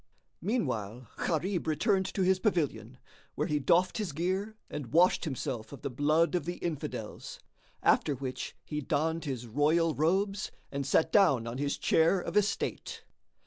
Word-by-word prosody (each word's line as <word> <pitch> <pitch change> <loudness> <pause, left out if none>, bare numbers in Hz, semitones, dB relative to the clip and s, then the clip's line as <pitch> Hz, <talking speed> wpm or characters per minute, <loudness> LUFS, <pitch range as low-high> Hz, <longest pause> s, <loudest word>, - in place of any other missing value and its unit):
Meanwhile 125 - -2 0.2
Gharib 175 +1 -1
returned 190 +4 +2
to 195 - +2
his 185 0 +3
pavilion, 135 - -1 0.4
where - - 0
he 150 -1 0
doffed 180 +8 +2
his 195 -8 -3
gear 190 +7 -2
and 140 -6 -6
washed 175 +3 +4
himself 130 -6 -4
of 140 - -10
the 140 - -3
blood 155 +7 +2
of 175 -5 0
the 175 +1 -3
Infidels; 165 -5 -5 0.4
after 145 - +3
which 130 -1 -5
he 150 -1 -3
donned 160 +3 -1
his 130 -4 -4
royal 155 +7 +2
robes 195 +7 0 0.2
and 140 -1 -3
sat 160 - +3
down 155 - +4
on 120 +3 -5
his 145 0 -1
chair 165 +4 +3
of - - -5
estate. 210 0 -1
160 Hz, 155 wpm, -30 LUFS, 140-185 Hz, 0.4 s, washed